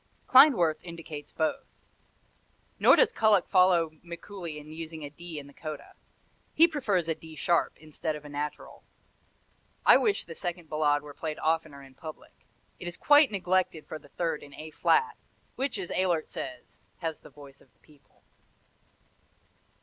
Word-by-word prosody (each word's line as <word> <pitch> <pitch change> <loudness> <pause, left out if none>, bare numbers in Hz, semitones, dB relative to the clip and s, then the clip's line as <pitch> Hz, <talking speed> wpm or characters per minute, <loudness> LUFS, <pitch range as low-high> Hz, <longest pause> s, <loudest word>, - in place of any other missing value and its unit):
Klindworth 255 - +6
indicates 165 -4 -9
both. 220 - -2 1.1
Nor - - +7
does - - +4
Kullak 215 -4 +3
follow 180 -4 +4
Mikuli 170 -1 -8
in 150 +1 -11
using 160 0 -7
a 145 - -8
D 170 +1 -9
in 145 - -7
the 140 - -15
coda. 155 -1 -8 0.6
He 330 - +7
prefers 210 - -1
a 165 - +1
D 160 0 -13
sharp, 170 +3 +1
instead 155 0 -4
of 150 0 -10
a - - -9
natural. 145 +1 -6 1.0
I - - +8
wish 415 -2 0
the 165 - -8
second 175 -1 -5
Ballade 145 -1 +2
were 145 -1 -10
played 155 +1 -5
oftener 155 -3 -1
in 135 -1 -15
public. 155 +3 -10 0.5
It - - -7
is 175 - -5
quite 290 -1 +6
neglected 185 -4 0
for 155 - -7
the 145 - -19
third 165 0 -2
in 145 -1 -13
A 155 0 -9
flat, 450 - +2 0.4
which, 265 -3 -2
as 185 -3 -5
Ehlert 175 -4 +1
says, 125 -2 -8
has 165 -3 -4
the - - -15
voice 140 -1 -15
of 130 - -24
the - - -38
people. 150 -2 -25
165 Hz, 165 wpm, -28 LUFS, 150-185 Hz, 1.1 s, I